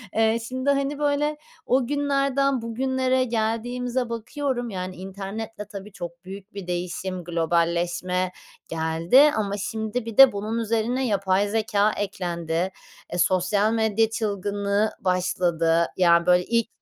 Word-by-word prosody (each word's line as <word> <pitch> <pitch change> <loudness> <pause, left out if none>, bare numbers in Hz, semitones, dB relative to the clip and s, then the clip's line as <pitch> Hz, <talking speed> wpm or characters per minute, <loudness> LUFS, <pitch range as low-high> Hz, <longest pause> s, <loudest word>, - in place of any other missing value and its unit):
Eee, 225 +1 +3
şimdi, 260 +2 -2
hani, 280 +1 0
böyle, 295 +1 +1 0.3
o 255 -1 +2
günlerden 275 -2 +1
bugünlere 260 +2 0
geldiğimize 240 +2 -1
bakıyorum, 245 +2 -3
yani, 185 -2 -5
internetle, 200 +3 -6
tabii, 200 0 -9
çok 175 0 -8
büyük 195 +2 -10
bir 195 -3 -7
değişim, 180 +1 -3
globalleşme 170 +2 0 0.4
geldi 165 - +4
ama 205 -1 -1
şimdi, 220 +3 -3
bir 230 -2 -7
de, 270 -2 +10
bunun 210 +3 -3
üzerine 230 +3 0
yapay 200 -1 +1
zekâ 215 -1 +1
eklendi. 175 -3 -2 0.4
Eee, - - -2
sosyal 185 +4 +2
medya 220 0 +2
çılgınlığı 205 -1 -1
başladı. 175 -2 +1
Ya, 170 -2 +4
böyle, 180 0 +4
ilk 230 -1 +1
210 Hz, 125 wpm, -24 LUFS, 180-245 Hz, 0.4 s, de